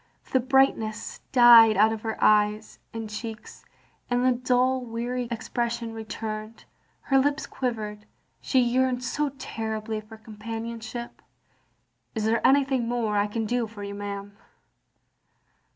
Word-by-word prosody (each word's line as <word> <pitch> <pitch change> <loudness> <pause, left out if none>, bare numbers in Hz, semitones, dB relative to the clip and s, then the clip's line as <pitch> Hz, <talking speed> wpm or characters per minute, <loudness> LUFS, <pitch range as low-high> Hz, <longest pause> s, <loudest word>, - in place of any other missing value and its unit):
The 260 - +4
brightness 255 -4 +1
died 235 -4 +8
out 220 +2 +5
of 220 - -6
her 220 -1 -3
eyes 210 0 +2
and 225 -1 -5
cheeks, 220 +1 -8 0.5
and 245 +1 +1
the 255 - +5
dull 255 +1 +1
weary 240 +1 -3
expression 235 0 -3
returned. 220 0 -6 0.4
Her 270 -1 +2
lips 285 +2 0
quivered. 215 -4 -4 0.3
She 260 - +2
yearned 250 +1 +1
so 290 +4 -1
terribly 220 -3 -4
for 215 +1 -13
companionship. 225 +2 -7 0.9
"Is 215 -1 -1
there 225 +1 +2
anything 270 -3 +3
more 230 -3 -1
I 205 0 +2
can 225 +2 -3
do 240 +1 -1
for 210 -2 -10
you, 200 0 -5
ma'am?" 200 0 -6
230 Hz, 130 wpm, -26 LUFS, 215-245 Hz, 0.9 s, died